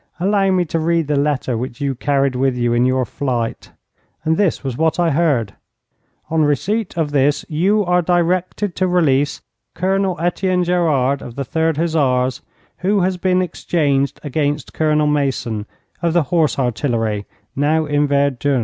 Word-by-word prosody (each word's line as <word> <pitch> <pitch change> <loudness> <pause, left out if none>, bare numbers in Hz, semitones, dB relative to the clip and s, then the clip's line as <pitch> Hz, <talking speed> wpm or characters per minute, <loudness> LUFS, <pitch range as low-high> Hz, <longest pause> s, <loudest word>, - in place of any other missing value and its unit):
Allow 195 +1 +2
me 185 -2 +2
to 165 +1 -2
read 165 0 +1
the 145 +1 -1
letter 140 -3 0
which 120 +2 -5
you 140 -2 -1
carried 135 +1 0
with 130 0 +1
you 120 -1 +1
in 120 +1 +3
your 130 0 +1
flight.' 120 -3 -3 0.6
And 160 +1 +2
this 190 -1 0
was 135 -3 -3
what 160 +4 0
I 170 -2 +2
heard: 140 -10 +1 0.8
'On 160 -1 +2
receipt 185 +7 -1
of 155 -3 0
this 145 0 +1
you 195 +7 +1
are 180 0 +2
directed 180 +2 0
to 185 - +1
release 145 -6 +1 0.3
Colonel 190 0 0
Etienne 180 +1 0
Gerard, 150 -7 +1
of 120 - -9
the 140 0 -3
3rd 160 +1 0
Hussars, 135 -6 +1 0.4
who 195 +2 +1
has 185 0 0
been 185 0 +1
exchanged 145 -5 -1
against 145 -1 -2
Colonel 150 -1 +2
Mason, 135 -7 -1 0.3
of 170 -1 +1
the 170 -2 +3
Horse 160 -4 +2
Artillery, 115 -5 -1 0.3
now 155 +3 +1
in 145 0 +1
Verdun.' 140 -1 +1
150 Hz, 160 wpm, -19 LUFS, 135-175 Hz, 0.8 s, in